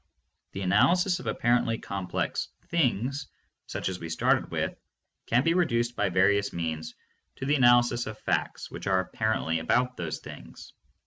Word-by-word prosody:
The 95 - -5
analysis 175 - +3
of - - -8
appar 120 +1 +2
ently 115 -1 -2
complex 95 -2 -3 0.2
things 135 -3 0 0.4
such - - -3
as 95 -1 -3
we 85 - -6
started 80 - +1
with - - -2 0.5
can 120 +3 +3
be 165 - +3
re 175 -1 +3
duced 120 -1 0
by - - +1
various 100 +2 +3
means, 80 -2 -4 0.4
to 135 - -5
the 145 - +2
analysis 120 -3 +4
of 110 0 -6
facts - - -2
which - - -7
are 95 -1 +3
apparently 95 -5 -1
about 125 +10 +1
those 80 -2 -3
things. - - -12
115 Hz, 165 wpm, -28 LUFS, 95-125 Hz, 0.5 s, analysis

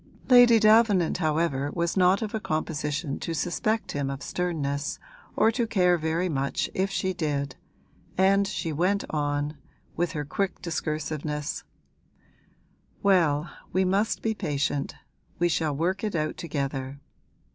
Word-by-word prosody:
Lady 245 -2 +8
Davenant, 215 -6 +4
however, 155 -4 0
was 170 0 0
not 185 +2 +4
of 215 - -4
a 220 - -1
composition 155 -3 -2
to 165 - -3
suspect 215 +7 -1
him 140 -1 -2
of 135 0 -5
sternness 155 -3 -2 0.4
or 225 - +4
to 235 0 -1
care 180 -5 +3
very 165 +2 0
much 140 -4 -1
if 190 +1 0
she 190 -1 -1
did, 140 -6 -2 0.6
and 195 +1 +4
she 165 -5 -3
went 185 +6 +1
on, 145 0 -1 0.4
with 175 +1 -1
her 150 -1 -3
quick 195 +6 -2
discursiveness: 155 -2 -3 1.4
'Well, 170 -6 +3 0.2
we 190 0 +2
must 200 +4 +1
be 225 - +1
patient; 145 -7 -2 0.4
we 175 - +2
shall 160 -3 0
work 185 +7 -1
it 210 -4 -2
out 155 -1 -1
together. 140 -3 -4
165 Hz, 135 wpm, -26 LUFS, 145-190 Hz, 1.4 s, Lady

